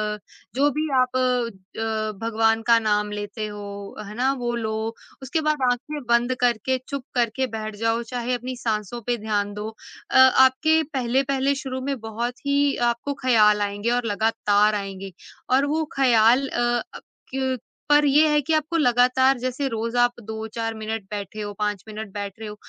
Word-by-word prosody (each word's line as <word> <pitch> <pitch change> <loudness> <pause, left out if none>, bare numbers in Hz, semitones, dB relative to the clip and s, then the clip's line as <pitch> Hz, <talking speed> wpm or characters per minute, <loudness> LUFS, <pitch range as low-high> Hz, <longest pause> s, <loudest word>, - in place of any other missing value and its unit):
अ, - - -10 0.4
जो 280 +3 +4
भी 310 +1 0
आप 255 0 +1
अ, 225 -3 -1
भगवान 225 0 +2
का 235 -1 +7
नाम 210 -1 0
लेते 210 +1 -4
हो, 200 -1 -8
है 210 - -9
ना? 255 +3 +2
वो 240 -1 -2
लो। 220 -1 -2 0.3
उसके 270 +5 -1
बाद 305 -2 0
आँखें 295 +5 -4
बंद 235 +2 +3
करके, 245 +1 +1
चुप 280 -2 -4
करके 245 +2 +1
बैठ 215 -1 -5
जाओ। 225 +2 0
चाहे 245 0 -1
अपनी 250 +1 -5
साँसों 220 +1 -2
पे 240 -1 +1
ध्यान 205 -2 -1
दो। 210 +1 -5 0.4
अ, - - +4
आपके 260 +4 +6
पहले-पहले 270 +2 +1
शुरू 260 -1 -4
में 275 0 -3
बहुत 235 +5 -5
ही 280 0 +2
आपको 235 +4 -3
ख़्याल 215 -5 +4
आएँगे 205 +2 -1
और - - -10
लगातार 210 -1 +2
आएँगे। 195 -1 -5 0.4
और 270 +2 +4
वो 320 0 0
ख़्याल 250 0 +4
अ - - -3 0.4
...अ, - - -7 0.3
क्य 260 -1 -1 0.3
पर 295 0 +5
ये 295 +2 +5
है 300 0 +3
कि 315 +3 -1
आपको 310 +2 +1
लगातार, 255 -1 +4
जैसे 255 +3 -2
रोज़ 230 +1 -3
आप 245 - +3 0.2
2-4 220 +1 -4
मिनट 220 0 -4
बैठे 210 +1 -5
हो, 205 0 -4
5 210 -2 -1
मिनट 215 -1 -7
बैठ 200 -1 -4
रहे 220 - -6
हो, 210 - -8
235 Hz, 175 wpm, -23 LUFS, 215-260 Hz, 0.4 s, का